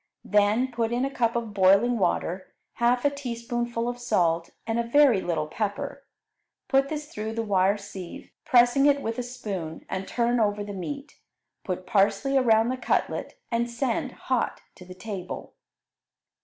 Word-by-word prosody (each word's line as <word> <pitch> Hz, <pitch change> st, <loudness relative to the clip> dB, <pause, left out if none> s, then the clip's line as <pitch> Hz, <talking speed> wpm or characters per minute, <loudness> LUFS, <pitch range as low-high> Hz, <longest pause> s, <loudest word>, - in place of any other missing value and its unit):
Then 210 Hz, +5 st, +3 dB
put 230 Hz, -1 st, -1 dB
in 245 Hz, +2 st, +1 dB
a 275 Hz, -, -3 dB
cup 235 Hz, -1 st, +1 dB
of 230 Hz, -3 st, -2 dB
boiling 200 Hz, +5 st, +4 dB
water, 185 Hz, 0 st, -1 dB, 0.3 s
half 245 Hz, +2 st, +2 dB
a 285 Hz, -, +4 dB
teaspoonful 240 Hz, -3 st, -3 dB
of 245 Hz, 0 st, -3 dB
salt, 170 Hz, -8 st, +1 dB, 0.2 s
and 225 Hz, +1 st, -1 dB
a -, -, +1 dB
very 240 Hz, -3 st, +4 dB
little 165 Hz, -4 st, -1 dB
pepper; 205 Hz, +6 st, -4 dB, 0.6 s
put 275 Hz, 0 st, +3 dB
this 300 Hz, -1 st, -4 dB
through 220 Hz, -4 st, -5 dB
the 230 Hz, 0 st, -2 dB
wire 195 Hz, -1 st, +2 dB
sieve, 195 Hz, -3 st, -9 dB
pressing 245 Hz, +3 st, +5 dB
it 280 Hz, -1 st, +3 dB
with 225 Hz, +2 st, -3 dB
a -, -, +1 dB
spoon, 200 Hz, -10 st, -6 dB
and 190 Hz, 0 st, -4 dB
turn 240 Hz, 0 st, +1 dB
over 205 Hz, -1 st, +1 dB
the 205 Hz, 0 st, -6 dB
meat. 280 Hz, -, -6 dB, 0.4 s
Put 185 Hz, -1 st, -4 dB
parsley 210 Hz, +8 st, +2 dB
around 230 Hz, -3 st, +4 dB
the 255 Hz, -, -1 dB
cutlet, 255 Hz, -, -1 dB
and 235 Hz, +1 st, 0 dB
send 240 Hz, +1 st, -2 dB
hot 255 Hz, -3 st, -2 dB
to 180 Hz, -, -14 dB
the 185 Hz, 0 st, -11 dB
table. 190 Hz, -2 st, -6 dB
230 Hz, 165 wpm, -26 LUFS, 195-245 Hz, 0.6 s, pressing